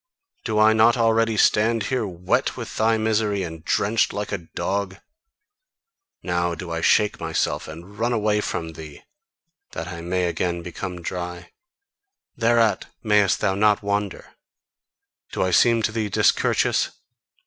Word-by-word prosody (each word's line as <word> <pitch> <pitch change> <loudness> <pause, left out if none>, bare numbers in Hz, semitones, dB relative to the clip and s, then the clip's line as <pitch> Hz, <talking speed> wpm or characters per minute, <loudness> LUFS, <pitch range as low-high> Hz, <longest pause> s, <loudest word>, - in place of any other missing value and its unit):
Do 110 -2 -2
I 110 +1 +6
not 115 +2 +4
already 115 -1 +2
stand 110 +2 +3
here 125 -3 -1
wet 90 -1 -1
with - - -7
thy 110 +1 +3
misery, 110 -2 0
and 80 -2 -7
drenched 105 +5 +1
like 105 0 -4
a 100 - -2 0.2
dog? 100 -1 -2 1.3
Now 85 -1 -1
do 85 0 -7
I 85 0 -2
shake 105 +5 +3
myself - - -2
and 85 +7 -11
run 120 +2 +1
away 105 -2 +1
from 80 -5 -4
thee, 75 -2 -11 0.7
that 85 +2 -5
I 85 -2 -7
may 90 +1 -1
again 85 0 -2
become 90 0 -6
dry: 90 0 -6 0.8
thereat 115 -2 +2 0.2
mayest 105 -3 +3
thou 95 - +2
not 105 +1 +2
wonder! 100 -1 -3 1.0
Do - - 0
I 95 - 0
seem 115 +5 +4
to 105 - +1
thee 110 -1 -2
discourteous? - - +2
100 Hz, 145 wpm, -23 LUFS, 90-110 Hz, 1.3 s, I